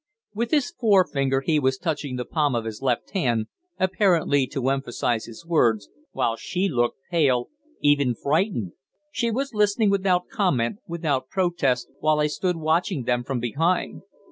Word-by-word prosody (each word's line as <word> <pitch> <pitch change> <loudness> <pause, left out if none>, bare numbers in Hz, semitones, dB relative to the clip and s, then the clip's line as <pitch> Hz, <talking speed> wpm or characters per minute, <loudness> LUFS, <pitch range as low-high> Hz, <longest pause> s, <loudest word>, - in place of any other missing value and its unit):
With 230 +3 -2
his 305 +1 +1
forefinger 180 - +2
he 155 +2 +2
was 130 -1 +1
touching 145 -4 -3
the 125 -1 -3
palm 150 -5 0
of 115 -1 -2
his 110 +1 -6
left 125 -3 -1
hand, 120 - 0 0.3
apparently 175 -8 +2
to 135 -2 -3
emphasize 125 -4 -1
his 115 +8 -12
words, 115 -11 +2 0.2
while 115 - 0
she 185 +10 -2
looked 120 -8 0
pale, 135 -8 +2 0.3
even 140 -4 +3
frightened. 145 - 0 0.4
She 235 -5 0
was 270 +4 -2
listening 210 0 +2
without 185 -2 +1
comment, 160 - 0
without 155 -6 -2
protest, 170 -10 0
while 155 0 +2
I 150 - +3
stood 180 +4 -1
watching 160 -1 0
them 120 0 0
from 130 0 -3
behind. 160 +10 0
150 Hz, 155 wpm, -24 LUFS, 125-185 Hz, 0.4 s, even